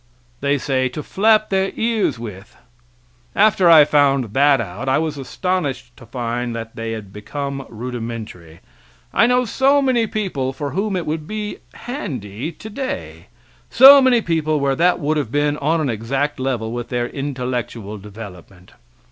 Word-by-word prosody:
They 140 +1 +1
say: 130 -1 0
"To 150 +4 -6
flap 215 +4 +2
their 195 0 +1
ears 225 - 0
with." 105 -5 -9 0.8
After 195 -5 +4
I 155 -3 +9
found 140 -7 +2
that 140 +1 +4
out 115 +5 -4
I 130 - +3
was 155 -1 -1
astonished 135 -4 -3
to 120 - -14
find 120 0 -3
that 115 -1 -7
they 115 0 -4
had 105 -3 -8
become 140 +5 -5
rudimentary; 115 -8 -7 0.5
I 230 - +4
know 250 0 +2
so 270 +5 +3
many 255 -5 +2
people 160 -12 -2
for 145 0 -4
whom 195 +4 -1
it 175 -3 -2
would 155 0 -3
be 210 0 -4 0.2
handy 135 - -5
today, 220 - -6 0.4
so 275 +2 +9
many 250 -4 +3
people 155 -2 0
where 140 -1 +1
that 175 +4 +2
would 155 +2 0
have 135 -7 -2
been 145 +1 +1
on 160 +4 +1
an 150 -4 -1
exact 135 +7 -2
level 125 -4 -2
with 120 0 -5
their 120 -1 -1
intellectual 125 -6 -4
development. 95 -3 -12
140 Hz, 155 wpm, -20 LUFS, 115-180 Hz, 0.8 s, I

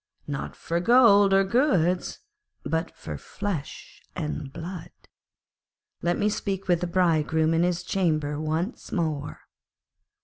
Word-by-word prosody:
'Not 140 -2 -5
for 170 +1 -2
gold 205 -1 +6
and 195 0 +4
goods, 185 - +1 0.4
but 160 +4 -1
for 75 -2 -7
flesh 200 -8 -6
and 75 - -4
blood. 170 +2 -7 1.1
Let 175 +1 +1
me 205 - +1
speak 195 -2 -2
with 175 -2 +2
the 180 - -1
Bridegroom 160 -2 +2
in 165 - +2
his 175 0 0
chamber 155 -6 0
once 160 +8 -3
more.' 155 -6 -2
175 Hz, 125 wpm, -26 LUFS, 155-195 Hz, 1.1 s, gold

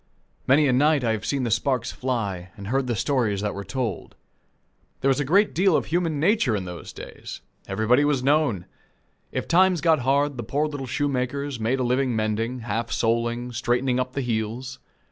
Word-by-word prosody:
Many 145 +3 +5
a 130 - +3
night 145 +1 +3
have 110 -3 0
I - - -18
seen 130 +5 -1
the 120 - -1
sparks 125 +1 0
fly 105 -9 -3
and 100 0 -7
heard 135 +1 0
the 120 - 0
stories 110 -4 0
that 105 0 -2
were 100 - -5
told. 120 -5 -4 0.9
There 135 - +2
was 135 +1 +2
a - - +1
great 195 +9 +3
deal 185 0 +3
of - - +1
human 165 -3 0
nature 165 - +2
in 95 -3 -3
those 90 -1 -8
days! - - -9 0.3
Everybody 120 +6 +2
was 145 -3 +1
known. 140 - +2 0.7
If - - -3
times 185 +1 +4
got 160 -1 +3
hard, 140 +2 +1
the 120 - -4
poor 140 +7 0
little 145 -3 -5
shoemakers 140 0 -2
made 120 +4 0
a - - +1
living 125 0 +1
mending, 110 +3 -1
half 115 +1 -3
soling, 120 +1 0
straightening 125 +2 0
up 125 0 -2
the 140 - -1
heels. 120 +2 -3
125 Hz, 190 wpm, -24 LUFS, 115-145 Hz, 0.9 s, Many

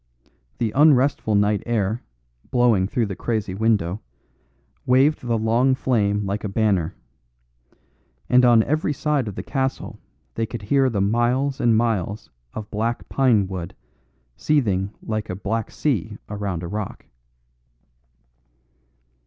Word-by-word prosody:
The 115 -3 -1
unrestful 140 -6 +3
night 105 0 +2
air, 110 -1 0 0.5
blowing 120 -7 +3
through 115 +3 0
the 100 -2 -5
crazy 110 -4 -2
window, 105 -2 0 0.8
waved 135 +4 +3
the 120 -2 -1
long 120 +4 +2
flame 105 -6 0
like 100 +2 -3
a 105 - -2
banner. 95 -4 0 1.3
And 125 0 +5
on 120 -2 +6
every 155 +2 0
side 145 -4 0
of 100 - -5
the - - -5
castle 135 -1 -3 0.3
they 115 0 -2
could 115 -2 -7
hear 135 +5 +2
the 105 -5 -1
miles 120 +6 +1
and 115 -2 +4
miles 110 -3 -1 0.2
of 105 -1 -7
black 115 +3 -2
pine 120 -7 +3
wood 90 -3 -6 0.6
seething 100 -11 +1
like 110 -1 -3
a 90 - -3
black 105 +3 -3
sea 110 - -2
around 100 -4 -4
a - - -4
rock. 105 +2 -5
110 Hz, 130 wpm, -22 LUFS, 100-125 Hz, 1.3 s, on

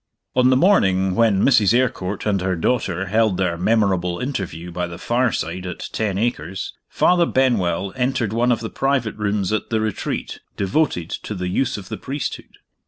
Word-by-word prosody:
On 125 0 +5
the 130 - +4
morning 95 - +3
when 105 -2 +3
Mrs. 115 -5 +5
Eyrecourt 105 -6 -1
and 100 -3 +1
her 95 0 0
daughter 95 -1 0
held 110 -1 +2
their 90 -3 0
memorable 95 -2 +1
interview 95 - -4
by 90 +1 -2
the 85 0 -8
fireside 95 -7 -1
at 90 - -6
Ten 105 -4 -1
Acres, 100 -4 -2 0.2
Father 175 -1 +3
Benwell 100 -8 +1
entered 125 -4 0
one 120 +2 +2
of 115 - +1
the 110 - -5
private 135 -5 0
rooms 105 -1 -1
at 110 - -2
The 110 - +1
Retreat, 110 -2 -3 0.2
devoted 95 - 0
to 105 - -5
the 90 -1 -3
use 125 +6 0
of 95 -2 -9
the - - -4
priesthood. 140 +2 -5
105 Hz, 170 wpm, -21 LUFS, 95-120 Hz, 0.2 s, On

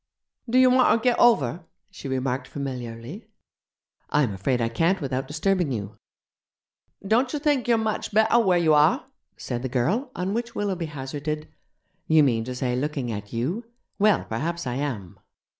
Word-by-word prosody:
'Do 245 - +2
you 255 0 +6
wanter 255 -2 +4
get 245 +1 +1
over?' 170 - +3 0.3
she - - -8
remarked 130 0 -2
familiarly. 130 - -6 0.8
'I'm 140 -8 +2
afraid 120 +7 -1
I 115 - +1
can't 165 +12 +1
without 135 -2 -3
disturbing 170 +1 0
you.' 105 -3 -4 1.1
'Dontcher 245 +8 +2
think 285 -4 +1
you're 235 -1 +4
much 220 0 -2
better 220 +3 +4
where 190 -6 +3
you 160 -3 +3
are?' 150 0 +4 0.3
said 120 -1 -4
the 130 - -3
girl, 180 - 0
on 185 +2 -2
which 235 +1 -3
Willoughby 190 -5 -2
hazarded: 150 +2 -5 0.6
'You 160 -1 +5
mean 115 -5 +2
to 125 +1 -5
say 125 -1 -1
looking 135 -2 -2
at 105 -1 -6
you? 140 - -2 0.4
Well, 210 -2 +3
perhaps 165 +9 -3
I 125 - -2
am!' 120 -11 -4
150 Hz, 160 wpm, -25 LUFS, 125-205 Hz, 1.1 s, you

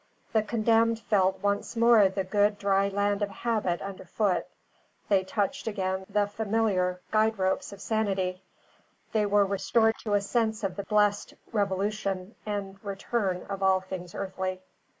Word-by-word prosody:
The 220 - +4
condemned 225 +1 +2
felt 190 -3 +1
once 200 +3 -1
more 230 -4 +6
the 190 0 -2
good 205 +2 +2
dry 195 -1 +2
land 205 +1 0
of 205 - 0
habit 210 -4 -1
under 195 -1 -7
foot; 205 -4 0 0.6
they 195 -2 +4
touched 205 +8 -2
again 190 -2 -2
the 205 0 +2
familiar 205 -4 0
guide 220 0 +2
ropes 190 +1 0
of 200 - -10
sanity; 195 -4 -1 0.7
they 210 -2 +2
were 205 0 +4
restored 220 +3 +2
to 210 -2 -1
a 205 - +3
sense 220 +1 0
of 190 -2 -1
the 200 - -5
blessed 210 -1 +1 0.2
revolution 200 -1 -1
and 195 -1 -4
return 195 -1 -2
of 195 -1 -5
all 190 -1 +4
things 185 -2 -7
earthly. 185 -1 -4
200 Hz, 150 wpm, -28 LUFS, 190-215 Hz, 0.7 s, more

